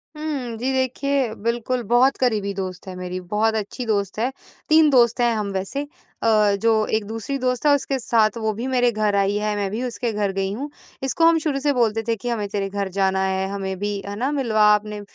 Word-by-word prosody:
हुँ, 285 -7 -4
जी 255 +4 -1
देखिए 260 -1 0
बिल्कुल 240 +2 -1
बहुत 255 +3 +4
क़रीबी 215 -6 0
दोस्त 185 -1 -6
है 185 - -6
मेरी, 180 0 -5
बहुत 210 +5 0
अच्छी 220 +4 -4
दोस्त 200 -2 -1
है, 245 +4 0 0.4
3 315 -1 +6
दोस्त 240 -3 +4
हैं 240 -1 +3
हम 210 -2 -2
वैसे 235 +10 -3 0.4
अ, 210 -3 +4
जो 220 -1 +3
एक 220 - -4
दूसरी 225 +6 -4
दोस्त 250 +1 -1
है 295 - +6
उसके 275 -1 -2
साथ 225 -1 +2
वो 220 0 0
भी 235 +5 -4
मेरे 245 -2 +2
घर 215 -2 0
आई 200 0 +2
है, 210 0 -1
मैं 200 -1 -1
भी 225 +4 -3
उसके 240 -1 -2
घर 205 -2 0
गई 195 0 -1
हूँ, 275 +7 -5 0.3
इसको 270 +5 +2
हम 330 0 +6
शुरू 300 -3 -1
से 285 +1 +1
बोलते 225 -3 +1
थे 230 - +1
कि 245 +3 -5
हमें 215 -4 -1
तेरे 200 -1 -2
घर 200 0 -2
जाना 190 -1 +2
है, 190 0 0
हमें 195 -1 -4
भी 205 0 -2
है 200 - -5
ना, 265 +4 0
मिलवा 230 -7 +1
अपने 210 0 -5
225 Hz, 220 wpm, -22 LUFS, 200-255 Hz, 0.4 s, 3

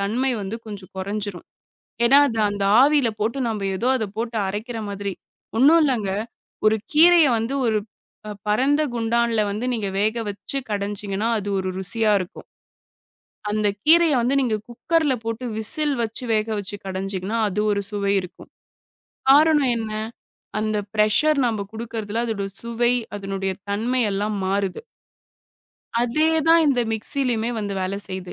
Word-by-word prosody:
தன்மை 235 +7 0
வந்து 200 +3 -4
கொஞ்சம் 200 -4 -9
குறைஞ்சிரும். 200 -1 -4 0.6
ஏன்னா, 275 +4 +7
அது 225 -3 -4
அந்த 200 -1 -2 0.2
ஆவியில 280 -3 +4
போட்டு 225 +5 -1
நாம்ப 215 -3 -2
எதோ 235 +6 0
அத 225 - -1
போட்டு 230 0 -3
அரைக்கிற 220 +4 -4
மாதிரி. 200 -1 -4 0.4
ஒண்ணும் 300 +7 +6
இல்லங்க. 235 -9 0 0.6
ஒரு 215 0 +5 0.2
கீரைய 335 +1 +7
வந்து 225 +4 -2
ஒரு 220 -2 +2 0.5
ப - - -6 0.2
பரந்த 270 +8 +2
குண்டான்ல 235 -1 +1
வந்து 210 +4 -3
நீங்க 210 -4 -2
வேக 215 +2 +1
வெச்சு 205 +7 -5
கடைஞ்சிங்கனா, 205 0 -2
அது 205 0 -5
ஒரு 185 0 -2
ருசியா 215 +3 +1
இருக்கும். 185 - -8 1.0
அந்தக் 210 -1 0
கீரைய 330 -1 +6
வந்து 250 +4 +1
நீங்கக் 215 -5 -1
குக்கர்ல 300 +4 +1
போட்டு 230 +2 -4
விசில் 295 +6 +1
வச்சு 230 +3 -4
வேக 215 0 +1
வச்சு 205 +1 -5
கடைஞ்சிங்கனா 190 +3 -3
அது 205 +2 -2
ஒரு 200 - +1
சுவை 200 -1 0
இருக்கும். 180 - -12 0.8
காரணம் 295 -2 +5
என்ன? 220 -1 -4 0.7
அந்த 215 0 -1 0.2
பிரஷர் 280 +9 +3
நாம 215 -4 -1
குடுக்குறதுல 225 0 -4
அதோட 210 -4 -2 0.2
சுவை, 235 +1 +1 0.2
அதனுடைய 195 -1 -3 0.2
தன்மை 235 +5 0
எல்லாம் 205 +2 -1
மாறுது. 195 - -1 1.2
அதே 305 +7 +2 0.2
தான் 330 0 +7
இந்த 270 -4 +3
மிக்ஸியிலுமே 235 0 0
வந்து 205 -1 -3
வேல 185 +1 -2
செய்து. 185 -1 -6
220 Hz, 140 wpm, -22 LUFS, 200-245 Hz, 1.2 s, ஏன்னா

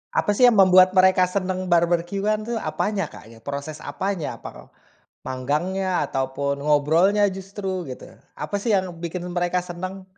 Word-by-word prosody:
Apa 205 - +2
sih 245 +5 +5
yang 240 - +4
membuat 185 -1 +6
mereka 185 0 +5
senang 185 -1 -2
barbeque-an 175 +5 +1
itu 235 - -2
apanya, 205 -3 -2
Kak, - - -13
ya? 115 0 -15
Proses 140 +2 -6
apanya? 160 - -3
Apakah - - -11 0.5
manggangnya 175 +9 -1
ataupun 135 +1 -2
ngobrolnya 160 +8 +3
justru 190 -1 -5
gitu. 130 - -10 0.2
Apa 205 - -4
sih 225 +2 -1
yang 185 -3 -2
bikin 170 +1 -5
mereka 175 0 0
senang? 185 +2 -7
180 Hz, 145 wpm, -23 LUFS, 155-195 Hz, 0.5 s, membuat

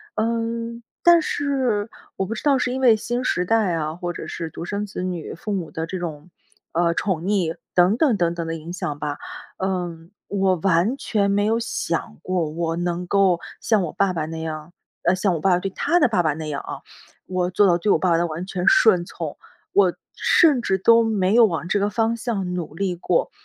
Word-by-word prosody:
嗯， 230 +1 -2 0.2
但 345 -1 +7
是， 260 -9 -1 0.2
我 190 - -1
不 210 - -4
知 225 - -6
道 285 -2 +4
是 250 -1 0
因 265 - -3
为 240 -4 +6
新 240 +3 -3
时 180 -7 0
代 215 -3 +2
啊， 155 -1 -2
或 175 0 -4
者 - - -7
是 165 -1 -5
独 170 - -7
生 200 +2 -3
子 185 - -5
女 180 -4 -4
父 210 - -6
母 175 -5 -3
的 160 -2 -4
这 185 +3 -5
种， 165 0 -6 0.4
呃， 170 0 +1
宠 185 -5 -1
溺， 185 -5 0 0.2
等 180 +5 +4
等 255 -6 +3
等 170 -2 +1
等 170 -1 -4
的 165 - -2
影 165 +2 -7
响 175 -5 -4
吧， 145 -1 -4 0.4
嗯， 175 -3 -3 0.2
我 195 -2 +1
完 185 - +2
全 205 -6 0
没 205 +1 +2
有 225 +2 +2
想 170 -7 -3
过 180 -4 -1
我 165 +1 -2
能 175 0 -2
够 190 -2 +3 0.2
像 215 -4 +2
我 165 - -4
爸 195 -1 +2
爸 165 -4 -2
那 160 +1 -6
样， 155 +1 -6 0.3
呃， 175 - +3
像 185 -1 +1
我 - - -3
爸 190 +5 +2
爸 180 - +3
对 195 - -3
他 340 - +1
的 - - +5
爸 210 -7 +1
爸 155 -2 +1
那 155 +1 -6
样 140 -1 -3
啊， - - -7 0.5
我 180 -1 -1
做 200 +3 +4
到 175 -2 +4
对 200 +4 +1
我 - - +4
爸 185 - +1
爸 165 - +4
的 170 - +1
完 165 +1 -4
全 185 -1 -3
顺 185 -6 +5
从， 165 -4 -6 0.4
我 190 -3 +4 0.2
甚 300 -7 +4
至 190 -5 +1
都 230 +4 +5
没 205 -4 +1
有 235 -1 +8
往 170 -4 -2
这 200 - +1
个 200 +1 +1
方 225 +2 0
向 205 -6 -3
努 170 -4 -4
力 185 0 -1
过。 340 - 0
185 Hz, 240 characters per minute, -22 LUFS, 170-215 Hz, 0.5 s, 有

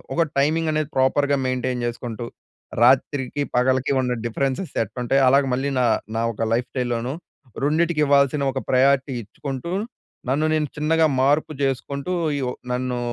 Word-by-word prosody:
ఒక 170 - +2 0.2
టైమింగ్ 155 +3 +1
అనేది 155 -1 -1
ప్రాపర్‌గా 140 +2 +2
మెయింటైన్ 125 -1 -2
జేసుకుంటూ 120 -1 -5 0.6
రాత్రికి, 135 +2 +2
పగలికి 130 +2 +2
ఉన్న 125 -1 -1
డిఫరెన్సెస్ 135 +9 -2
ఎట్టుంటాయొ, 125 +5 0
అలాగ 140 +2 +5
మళ్ళీ 135 +3 0
నా 125 - +3 0.3
నా 115 - 0
ఒక 115 +1 -2
లైఫ్ 120 +2 0
స్టైల్‌లోను 120 -1 -2 0.5
రెండిటికి 155 +2 +1
ఇవ్వాల్సిన 140 0 +3
ఒక - - -3
ప్రయారిటీ 135 +1 +3
ఇచ్చుకుంటూ, 135 - -6 0.6
నన్ను 145 +4 +1
నేను 155 -1 0
చిన్నగా 160 +2 +2 0.2
మార్పు 145 +3 +2
చేసుకుంటూ 140 +4 -2 0.3
ఈ - - -2
ఒ - - -4 0.2
నన్నూ 125 0 -2
135 Hz, 140 wpm, -22 LUFS, 125-145 Hz, 0.6 s, అలాగ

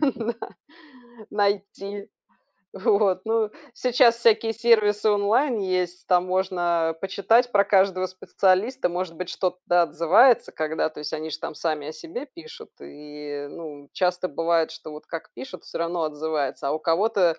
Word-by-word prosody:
на 235 -5 0 1.0
найти. 200 0 -2 0.7
Вот, 190 -1 +2
ну, 225 -1 +1 0.2
сейчас 245 -1 +4
всякие 225 -1 +3
сервисы 215 -2 +3
онлайн 215 +5 +2
есть, 180 -2 -2
там 180 -1 +3
можно 175 -3 0
почитать 225 +6 +2
про 200 -3 +4
каждого 190 -2 +2
специалиста. 190 +5 0
Может 175 -1 -4
быть, 180 +1 -5
что-то 180 -1 +1
отзывается, 195 +10 +4
когда, 155 0 -1
то 155 - -13
есть 150 - -5
они 155 +1 -5
ж 155 - -5
там 160 - -6
сами 155 -2 -3
о 155 - -5
себе 165 - -7
пишут 340 - -13
и, 145 -1 -8
ну, 145 -4 -10
часто 180 0 0
бывает, 165 +1 +1
что 160 -1 -10
вот 150 - -11
как 165 -2 -7
пишут, 265 - -9
всё - - -7
равно 170 0 -1
отзывается. 150 -3 -2
А - - 0
у 155 - -1
кого-то 175 0 +2
185 Hz, 150 wpm, -24 LUFS, 165-210 Hz, 1.0 s, сейчас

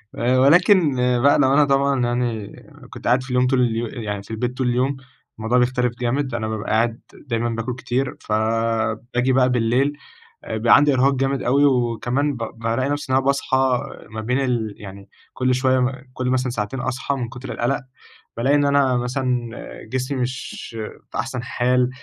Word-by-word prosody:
آآ 125 +2 +2
ولكن 165 +1 +5 0.3
بقى 140 +1 +5
لو 135 -1 +4
أنا 145 0 +5
طبعًا 140 -1 +2
يعني 120 -4 -2 0.4
كنت - - -8
قاعد 125 +1 +3
في 135 - -11
اليوم 125 0 +2
طول 130 -1 +2
اليو 115 -1 0
يعني 105 -4 -5
في 105 - -13
البيت 125 +3 -3
طول 130 -2 0
اليوم، 130 +3 0 0.4
الموضوع 115 +3 +1
بيختلف 125 -1 +2
جامد، 130 +1 -1
أنا 110 -2 -2
بابقى 110 -1 -4
قاعد 115 +1 +1
دايمًا 120 -3 -3
باكل 115 +2 -3
كتير، 125 +1 -2
فباجي 115 +3 0
بقى 130 -1 +4
بالليل 125 +4 +1 0.5
بيبقى 110 +2 +4
عندي 145 -1 +4
إرهاق 135 +2 +3
جامد 135 +1 0
أوي، 140 +4 +3
وكمان 125 +2 +1
ب 115 - -6 0.2
بالاقي 115 +4 -1
نفسي 145 -2 -3
إن - - +4
أنا 135 - +2
باصحى 140 -1 +1 0.5
ما 110 0 -5
بين 125 +4 0
ال 120 -5 -1
يعني 100 0 -11 0.2
كل 130 0 +1
شوية 130 0 +2
م 125 +1 +2 0.2
كل 125 0 -2
مثلًا 130 0 0
ساعتين 115 +2 -3
أصحى 130 +3 -2
من 125 -3 -3
كتر 125 +2 -8
القلق، 135 +4 -1 0.6
بالاقي 135 +5 +2
إن 145 0 +3
أنا 140 -3 +3
مثلًا 125 -1 -1 0.4
جسمي 130 +2 -2
مش 130 +1 -5 0.4
في - - -11
أحسن 125 +1 -3
حال، 125 0 +1
125 Hz, 175 wpm, -21 LUFS, 115-135 Hz, 0.6 s, ولكن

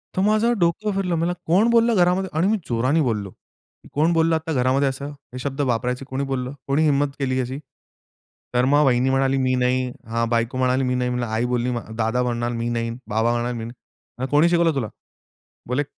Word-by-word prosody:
तर 185 - +1
माझं 215 +3 +3
डोकं 175 +5 +1
फिरलं. 180 -3 0
मला 170 +2 0
कोण 195 +8 +3
बोललं 230 -1 +4
घरामध्ये 180 +1 +2
आणि 175 +4 +3
मी 220 +1 +2
जोराने 130 +7 +1
बोललो. 105 -7 -1 0.6
कोण 160 +4 +2
बोललं 165 0 +3
आता 160 0 -3
घरामध्ये 130 +2 +2
असं, 140 +2 -5 0.2
हे 125 - -6
शब्द 140 +1 -3
वापरायचे 125 +3 -2
कोणी 135 +1 -3
बोललं, 130 +1 -2
कोणी 145 +3 +2
हिम्मत 145 -1 +3
केली 130 -1 0
अशी? 130 +3 -3 0.9
तर 125 +1 +3
मग 145 +2 +4
वहिनी 130 0 +3
म्हणाली, 135 0 +2
"मी 130 -1 +1
नाही," 125 0 +1 0.2
हा 115 +1 0
बायको 115 +2 0
म्हणाली, 130 +1 +2
"मी 125 0 0
नाही," 125 0 0
म्हणलं 125 -1 -1
आई 110 +2 -1
बोलली 125 0 0 0.3
दादा 115 +3 +1
म्हणाला, 120 -1 -1
"मी 115 +1 -2
नाही," 115 -1 -1 0.2
बाबा 110 +2 +1
म्हणाले, 120 +1 -1
"मी 115 - -5
नाही." 125 +2 -10
"कोणी 155 +4 +5
शिकवलं 170 -2 +3
तुला?" 120 -5 -1 0.8
बोले 130 +4 0
130 Hz, 195 wpm, -22 LUFS, 125-160 Hz, 0.9 s, कोणी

